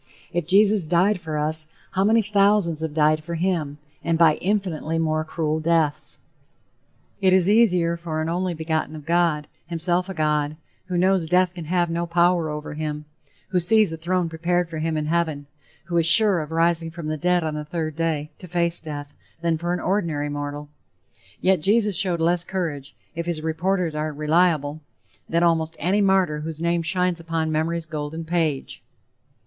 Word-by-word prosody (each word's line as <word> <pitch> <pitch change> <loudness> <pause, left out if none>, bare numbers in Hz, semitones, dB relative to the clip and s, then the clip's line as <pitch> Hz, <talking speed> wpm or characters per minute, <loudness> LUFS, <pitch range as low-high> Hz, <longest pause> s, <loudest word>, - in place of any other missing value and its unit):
If 175 -2 -2
Jesus 200 -1 +4
died 180 +4 +2
for 155 -2 -4
us, 155 +1 -1 0.2
how 190 - +1
many 220 +2 +4
thousands 200 -5 +2
have 160 -2 -4
died 155 0 +2
for 170 +1 -5
him 165 -5 -1 0.3
and 165 -1 +1
by 160 -2 +5
infinitely 180 -5 -1
more 155 -1 0
cruel 155 0 -2
deaths? 160 -2 0 1.0
It 190 -1 +4
is 185 -1 +4
easier 180 -6 +3
for 165 -2 -4
an 155 - -2
"only 175 +1 -1
begotten" 160 -1 -2
of 150 -2 -10
God, 165 -3 +1 0.2
himself 175 +2 -1
a 190 - -5
God 150 -1 0 0.3
who 180 -1 -2
knows 185 -2 +2
death 180 +1 +2
can 175 -3 -8
have 175 +1 0
no 170 +1 -2
power 170 -1 +2
over 150 0 -5
him 150 0 -4 0.4
who 185 - +1
sees 215 0 +4
a - - -3
throne 175 +2 -1
prepared 170 +1 -1
for 160 - -4
him 160 0 -1
in 155 - -2
heaven 155 -3 -1 0.4
who 175 0 -4
is 165 -1 +3
sure 205 0 +7
of 150 - -7
rising 165 0 +1
from 165 0 -8
the 155 0 -2
dead 175 +2 +1
on 155 -1 -2
the 150 0 -4
third 155 0 -4
day 155 -2 -2
to 180 - -10
face 170 0 +1
death, 145 -2 -7 0.3
than 170 -1 +1
for 170 +2 -3
an 180 - -1
ordinary 165 -7 -1
mortal. 145 0 -5 0.7
Yet 185 -3 +2
Jesus 210 +2 +2
showed 180 -2 +1
less 170 +1 +2
courage, 160 -7 -4 0.2
if 170 0 -5
his 160 -3 -3
reporters 170 +1 -1
are 155 0 -2
reliable, 155 0 +1 0.5
than 170 +1 +1
almost 165 -1 +1
any 190 +6 +1
martyr 190 -6 +2
whose 155 0 -6
name 170 0 0
shines 180 0 0
upon 165 -1 -2
memory's 160 +2 -1
golden 155 +1 -5
page. 160 -5 -2
165 Hz, 180 wpm, -23 LUFS, 155-180 Hz, 1.0 s, sure